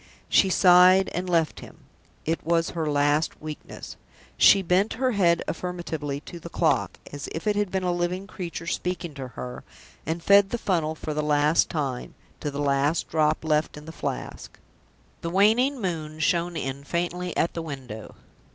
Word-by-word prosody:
She 195 - +4
sighed 185 +1 +6
and 180 +1 -3
left 165 -3 +1
him. - - -13 0.4
It 165 +1 -1
was 165 0 +1
her 160 -3 -2
last 145 +2 +1
weakness. 155 -1 -8 0.4
She 195 -1 +6
bent 185 +4 +2
her 255 +2 0
head 175 -6 +2
affirmatively 160 -5 -4
to 170 - -10
the - - -9
clock, - - +1 0.2
as 145 -1 -6
if 160 - -5
it 210 -1 +2
had 205 -1 0
been 190 0 -2
a 180 - +1
living 175 +2 -2
creature 175 -4 -6
speaking 175 -1 -3
to 135 -2 -6
her; 65 - -8 0.4
and 165 +2 -3
fed 200 0 +6
the 240 - -2
funnel 165 -8 0
for 155 0 -5
the 150 - -1
last 150 +1 +3
time, 135 -6 -3 0.2
to 150 - -3
the 140 - -6
last 145 +2 +1
drop 155 0 +1
left 155 -1 +1
in 150 - -10
the 160 - -8
Flask. - - -6 0.6
The 165 - -3
waning 225 +9 +3
moon 160 -6 -3
shone 170 +2 +1
in 135 0 -4
faintly 175 +3 -3
at 165 - +1
the 165 - -4
window. 130 -8 -8
165 Hz, 175 wpm, -25 LUFS, 150-180 Hz, 0.6 s, sighed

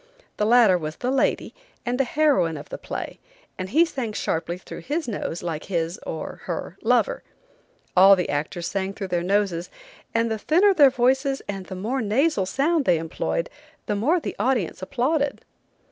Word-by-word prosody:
The 210 - +1
latter 225 -6 +6
was 155 -1 -5
the 250 +1 -2
lady, 270 - 0 0.3
and 245 +1 -1
the - - +5
heroine 255 - +2
of 145 - -10
the - - -6
play, - - -6 0.4
and 185 0 -4
he 320 - +5
sang 260 -9 -4
sharply 170 -2 -2
through 180 - -9
his 300 - -3
nose 200 -6 -4
like 160 -3 -4
his, 170 -2 -2
or 160 - -6
her, - - -4
lover. - - +2 0.7
All 195 +2 +8
the 180 -2 -2
actors 155 +4 -2
sang 195 0 -2
through 195 -3 -5
their 175 -1 0
noses, 185 -2 0 0.5
and 230 0 +2
the 220 - -2
thinner 370 - +4
their 290 -6 +7
voices 265 +2 +1
and 195 -2 -5
the 190 - -6
more 230 +8 -2
nasal 220 - +1
sound 285 - +1
they 175 - +4
employed 165 +1 -2 0.4
the 210 - -1
more 290 - +2
the - - -5
audience 220 -7 0
applauded. 275 +8 -1
210 Hz, 175 wpm, -24 LUFS, 180-270 Hz, 0.7 s, All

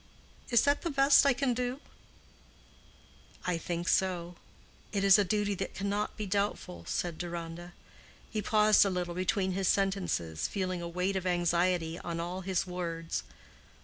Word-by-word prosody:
Is 235 -2 +4
that 285 +1 +2
the 340 - -2
best 275 -1 +5
I 275 - +5
can 255 0 0
do?" 250 +2 -2 1.7
"I 180 -2 0
think 170 +1 -3
so. 180 -2 +1 0.6
It 200 -2 -1
is 195 +1 +7
a - - +4
duty 205 +1 0
that 195 - -5
cannot 200 +1 -2
be 215 - -3
doubtful," 200 -2 -2
said 170 -2 -2
Deronda. 175 0 -6 0.5
He 215 - -3
paused 215 0 +5
a 200 - +1
little 180 -2 -2
between 185 +1 0
his 190 0 -1
sentences, 190 - 0
feeling 185 -2 -2
a 170 - -4
weight 180 +3 -1
of 185 -1 -2
anxiety 175 -1 +1
on 170 -1 -4
all 175 +2 -4
his 190 0 -1
words. 170 -2 -3
185 Hz, 155 wpm, -30 LUFS, 175-205 Hz, 1.7 s, is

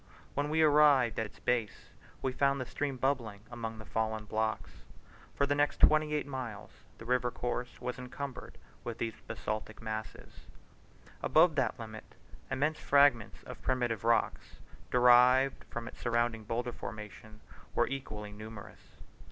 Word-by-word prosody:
When 145 +1 -1
we 160 +1 +3
arrived 145 -6 +5
at 110 - -1
its - - -20
base 115 -4 -2 0.3
we 130 - +1
found 140 +1 +2
the 130 - -3
stream 140 +1 -3
bubbling 120 -6 -1
among 115 -2 -5
the 110 - -10
fallen 110 0 -2
blocks. 110 +1 -3 0.5
For 140 - +2
the 140 - +1
next 145 0 +1
twenty 155 0 +5
eight 150 - -1
miles 125 -7 -6 0.3
the 115 - -11
river 125 0 +1
course 125 0 -4
was 125 0 -4
encumbered 125 +1 -7 0.3
with 115 -1 -5
these 115 -2 -4
basaltic 110 0 -4
masses. 110 -1 -7 0.7
Above 160 +1 +5
that 130 -6 0
limit 110 -1 -9 0.3
immense 150 +3 0
fragments 140 -6 +3
of - - -10
primitive 120 -4 0
rocks, 115 0 0 0.3
derived 125 +2 +5
from 120 -1 -6
its - - -10
surrounding 120 -2 0
boulder 120 +3 -2
formation, 105 0 -9 0.4
were - - +4
equally 105 -6 -6
numerous. 105 0 -11
120 Hz, 145 wpm, -32 LUFS, 110-135 Hz, 0.7 s, arrived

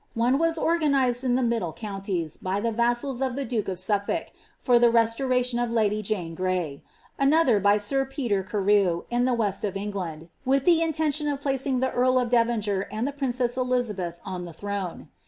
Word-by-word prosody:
One 245 +4 +2
was 330 0 +1
oiganised 280 -7 +1
in 250 -2 +2
the 255 - +1
mid 235 -1 +1
con* 195 +3 -5
ties, 175 -6 -3
by 190 +2 -2
the 230 +2 -1
vassals 240 +3 0
of 260 -2 -1
the 280 0 -3
duke 225 -3 -2
of 190 -2 -3
Suflblk, 205 - -1 0.3
for 245 -2 +3
the 240 0 +5
restoration 240 +2 +2
of 240 -1 0
kdv 215 -2 +1
Jane 190 -6 -3
Gray; 180 -5 -2 0.4
another 275 -5 +4
by 205 +1 +4
sir 270 +7 +1
Peter 260 -7 -1
Carew, 190 -2 +1
in 240 +1 +2
the 255 -1 +2
west 205 -4 -1
of 200 -2 -2
England, 180 -6 -5
villi 265 +2 +3
the 330 +4 +3
intention 310 -2 0
of 285 -2 -1
placing 270 -2 -1
the 260 - +1
earl 255 +1 +2
of 245 -2 0
Devonshire 220 -5 +1
and 220 +4 -2
the - - -2
princess 250 -3 -1
Elia 250 -3 0
beth 175 -3 -5
on 185 -2 -5
the 170 - -9
throne.' 195 -3 -5
235 Hz, 195 wpm, -25 LUFS, 200-260 Hz, 0.4 s, the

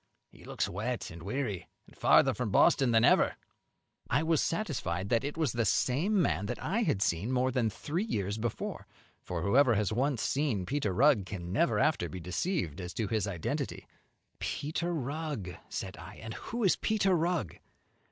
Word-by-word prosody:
he - - -17
looks - - -2
wet 110 +5 -3
and 85 0 -10
weary, 105 0 -3 0.2
and - - -19
farther - - +5
from - - -2
Boston 135 -2 +4
than 115 0 +5
ever." - - +4 0.7
I 150 - +2
was 160 -2 +2
satisfied 115 - -2
it 140 +6 0
was 155 -7 +1
the 115 +1 0
same 155 - +2
man 95 - +1
that - - -3
I 205 +8 -1
had 145 - +1
seen 100 +4 0
more 130 0 +2
than 120 -3 +1
three 155 - -3
years 100 - -2
before; 120 0 -4 0.3
for - - -4
whoever 125 +4 +4
has 105 0 0
once 130 0 0
seen 130 -10 0
Peter 135 -5 -1
Rugg 110 -2 +4
can 90 -3 -5
never 170 +11 +2
after 140 - +2
be 95 - -6
deceived 90 - -2
as 90 0 -7
to 110 -4 -1
his 110 -3 0
identity. 90 -5 -3 0.5
"Peter 160 +4 -2
Rugg!" 145 - -3
said - - -5
I, - - -10
"and 110 0 -7
who 235 - -4
is 190 - +4
Peter 195 -4 +2
Rugg?" 165 - -1
120 Hz, 175 wpm, -31 LUFS, 100-155 Hz, 0.7 s, farther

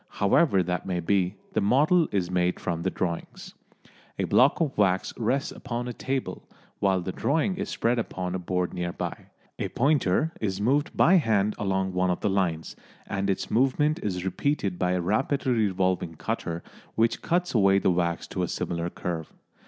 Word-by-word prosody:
However 100 - +3
that 90 +1 -3
may 90 -2 -1
be, 95 +2 +1 0.2
the - - +1
model 150 - +4
is 90 -3 -1
made 90 0 +1
from 85 -2 -2
the 95 - 0
drawings. 85 -2 -4 0.6
A - - -1
block 130 +3 +4
of 155 -5 0
wax 95 -2 +1
rests 130 +5 0
upon 120 0 -5
a 125 - -4
table, 130 +1 -4 0.3
while 95 -2 +2
the 95 - -4
drawing 160 - 0
is - - -3
spread 120 +1 0
upon 90 -5 -3
a 95 - -2
board 90 0 -2
near 90 -1 -2
by. - - -5 0.3
A - - -1
pointer 145 - +2
is 95 -3 -1
moved 140 +8 +1
by 185 +3 +6
hand 105 - +2
along 95 -2 0
one 90 0 +1
of 90 - -1
the 105 - +1
lines, 85 -5 -1 0.3
and 100 0 -2
its 95 - -2
movement 135 +5 +2
is 90 -3 -3
repeated 95 -2 -1
by 90 0 +1
a 90 - 0
rapidly 130 +8 0
revolving 95 -6 0
cutter 85 +2 -3 0.3
which 115 +1 +1
cuts 175 +1 0
away 100 -4 +4
the 95 - +2
wax 85 -1 0
to - - -3
a - - 0
similar 85 0 -3
curve. 85 -3 -5
95 Hz, 180 wpm, -26 LUFS, 90-125 Hz, 0.6 s, by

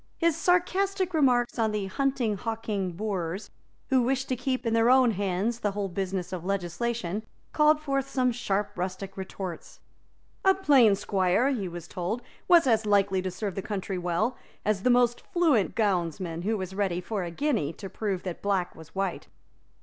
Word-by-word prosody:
His 335 -2 +2
sarcastic 365 +2 +1
remarks 250 -6 +2
on 220 -1 +2
the 210 -2 -2
hunting, 255 +1 0
hawking 210 -3 -3
boors, 190 -1 -3 0.4
who 260 -2 +4
wished 260 +2 0
to 255 - +1
keep 255 0 -2
in 230 - +1
their 230 +1 +4
own 255 -2 +6
hands 200 +3 -1
the 205 -3 -1
whole 200 -1 -2
business 185 -1 -3
of 175 -2 -4
legislation, 195 +2 -2 0.3
called 300 0 +4
forth 275 -3 -1
some 255 -2 +2
sharp 210 -4 -1
rustic 185 +2 -4
retorts. 190 -2 -7 0.6
A 385 0 +5
plain 270 - +5
squire, 195 +5 +1
he 215 -8 -2
was 175 -1 -7
told, 185 +9 -3 0.2
was 345 -3 +6
as 220 -4 +2
likely 200 -2 +3
to 185 - -2
serve 195 +2 -4
the 195 - -3
country 195 -2 -3
well 180 +8 0 0.3
as 210 -2 +1
the 250 - +2
most 245 -1 +3
fluent 310 - +2
gownsman, 175 -5 0
who 220 +1 +1
was 190 -1 -5
ready, 190 -3 0
for 195 +2 -3
a 175 - -4
guinea, 210 - 0
to 195 - -8
prove 190 -1 -3
that 180 -3 -5
black 195 -3 0
was 160 +1 -14
white. 195 -2 -2
210 Hz, 175 wpm, -27 LUFS, 185-250 Hz, 0.6 s, own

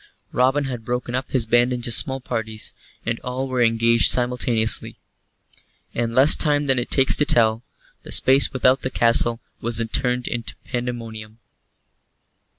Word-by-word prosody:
Robin 135 +3 +1
had 125 -4 -6
broken 125 +1 -4
up 130 +1 -3
his 125 -4 0
band 120 +2 +2
into 120 -1 -4
small 135 +3 +3
parties, 110 -3 -6 0.3
and 115 0 -3
all 130 +2 -5
were 130 -1 -2
engaged 115 0 +3
simultaneously. 120 -3 -1 1.0
In 115 0 -3
less 135 +4 +7
time 145 -1 +1
than 135 -2 +1
it 120 - -5
takes 135 -1 +3
to 145 - +1
tell, 115 -5 +3 0.4
the - - -12
space 135 +1 +5
without 130 0 +1
the 130 - -3
castle 115 -1 +1 0.2
was 115 0 -1
turned 125 -1 -1
to 120 -2 -4
pandemonium. 115 -3 -6
120 Hz, 150 wpm, -21 LUFS, 115-130 Hz, 1.0 s, less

